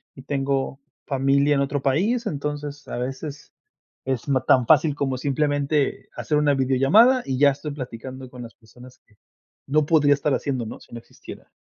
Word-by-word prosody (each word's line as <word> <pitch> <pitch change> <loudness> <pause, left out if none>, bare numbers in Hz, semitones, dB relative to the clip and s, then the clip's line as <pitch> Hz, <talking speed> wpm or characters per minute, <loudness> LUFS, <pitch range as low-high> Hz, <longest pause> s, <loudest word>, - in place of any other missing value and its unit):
y 130 - -12
tengo 135 -1 -2 0.3
familia 140 +1 +2
en 140 - +1
otro 140 0 -1
país, 205 - 0
entonces 145 -3 -5
a - - -5
veces 135 +4 -6 0.5
es 130 0 -3
no 135 -2 +1
tan 125 -3 +3
fácil 150 -1 +4
como 135 -3 -2
simplemente 145 +1 -1
hacer 150 - -1
una 145 -1 +2
videollamada 135 - +4
y 130 -1 -2
ya 140 0 +5
estoy 145 +2 -6
platicando 130 -1 -8
con 125 -1 -10
las 115 - -12
personas 125 +3 -16
que 105 -1 -30 0.5
no 150 +1 +2
podría 145 -3 +4
estar 145 0 0
haciéndolo, 130 -6 -3
¿no?, - - -15
si - - -17
no 115 - -6
existiera. - - -13
140 Hz, 175 wpm, -23 LUFS, 130-150 Hz, 0.5 s, ya